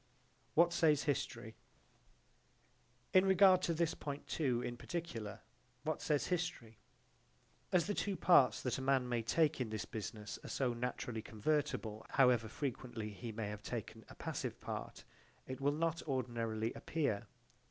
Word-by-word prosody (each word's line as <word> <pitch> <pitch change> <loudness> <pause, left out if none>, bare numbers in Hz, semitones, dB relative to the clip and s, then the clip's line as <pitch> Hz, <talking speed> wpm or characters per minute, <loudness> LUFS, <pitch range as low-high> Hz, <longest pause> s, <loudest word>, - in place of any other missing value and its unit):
What 170 +1 +5
says 155 -4 +4
history? 120 -5 -2 1.6
In 185 - +7
regard 190 -1 +6
to 170 - +1
this 165 0 +1
point 145 -1 -5
too 125 -6 0
in 120 - -3
particular, 120 - -5 0.4
what 155 -1 -2
says 150 -2 +1
history? 175 - -2 0.9
As 180 -3 +4
the 205 - 0
two 200 -1 -1
parts 170 -6 +5
that 125 +1 -1
a - - -4
man 130 -1 +2
may 120 -1 0
take 155 +4 +2
in 120 - -1
this 110 -3 -3
business 105 0 -6
are - - -7
so 125 -3 0
naturally 120 -1 -3
convertible 110 -2 -1
however 125 -4 +4
frequently 120 -3 -4
he 105 +4 -6
may 110 -1 -3
have 105 0 -6
taken 110 0 -5
a - - -11
passive - - -4
part, - - -6 0.4
it 130 +1 -6
will 140 +1 +3
not 165 +2 0
ordinarily 115 -4 -1
appear. 140 -11 -1
130 Hz, 150 wpm, -36 LUFS, 115-155 Hz, 1.6 s, In